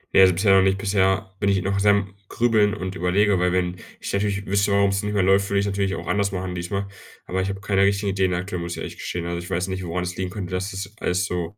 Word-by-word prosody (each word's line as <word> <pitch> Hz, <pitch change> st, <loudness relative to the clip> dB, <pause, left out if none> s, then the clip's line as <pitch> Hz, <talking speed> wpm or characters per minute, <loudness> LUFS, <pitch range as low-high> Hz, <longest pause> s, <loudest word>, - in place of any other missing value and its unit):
Ne, -, -, +8 dB
also, 95 Hz, -1 st, +7 dB
bisher 95 Hz, +2 st, +4 dB
noch 95 Hz, -, +6 dB
nicht. 95 Hz, 0 st, +2 dB
Bisher 95 Hz, -1 st, +1 dB
bin 100 Hz, -, +1 dB
ich 100 Hz, -1 st, +2 dB
noch 100 Hz, 0 st, 0 dB
sehr 105 Hz, +1 st, +4 dB
am 100 Hz, -1 st, 0 dB, 0.2 s
Grübeln 110 Hz, -3 st, +2 dB
und 95 Hz, -1 st, -5 dB
überlege, 95 Hz, +2 st, +2 dB
weil 90 Hz, 0 st, +2 dB
wenn 90 Hz, 0 st, 0 dB, 0.2 s
ich -, -, -5 dB
natürlich 100 Hz, 0 st, -1 dB
wüsste, 100 Hz, +1 st, +1 dB
warum's 100 Hz, 0 st, +2 dB
nicht 105 Hz, 0 st, -3 dB
mehr 100 Hz, -, +3 dB
läuft, 95 Hz, +1 st, +3 dB
würde 100 Hz, -, +1 dB
ich's 100 Hz, -, 0 dB
natürlich 100 Hz, -1 st, -1 dB
auch -, -, -7 dB
anders 100 Hz, 0 st, 0 dB
machen 95 Hz, -1 st, -4 dB
diesmal, 100 Hz, +3 st, -3 dB, 0.4 s
aber 95 Hz, +1 st, -1 dB
ich 95 Hz, -, -2 dB
habe 95 Hz, 0 st, -5 dB
keine 100 Hz, -2 st, +1 dB
richtigen 100 Hz, 0 st, +2 dB
Ideen 95 Hz, -1 st, +1 dB
aktuell, 90 Hz, 0 st, -4 dB
muss 85 Hz, 0 st, -4 dB
ich -, -, -7 dB
ehrlich -, -, -6 dB
gestehen. 85 Hz, -1 st, -4 dB
Also, 85 Hz, 0 st, -3 dB
ich 90 Hz, +2 st, -8 dB
weiß 90 Hz, +1 st, -1 dB
nicht, 95 Hz, 0 st, -4 dB
woran 90 Hz, +1 st, -2 dB
es 90 Hz, 0 st, -4 dB
liegen 95 Hz, -1 st, -3 dB
könnte, 95 Hz, -2 st, -6 dB
dass 90 Hz, +2 st, -2 dB
das 95 Hz, +1 st, -6 dB
alles 90 Hz, +1 st, 0 dB
so, 90 Hz, +2 st, -4 dB
95 Hz, 275 wpm, -23 LUFS, 90-100 Hz, 0.4 s, Ne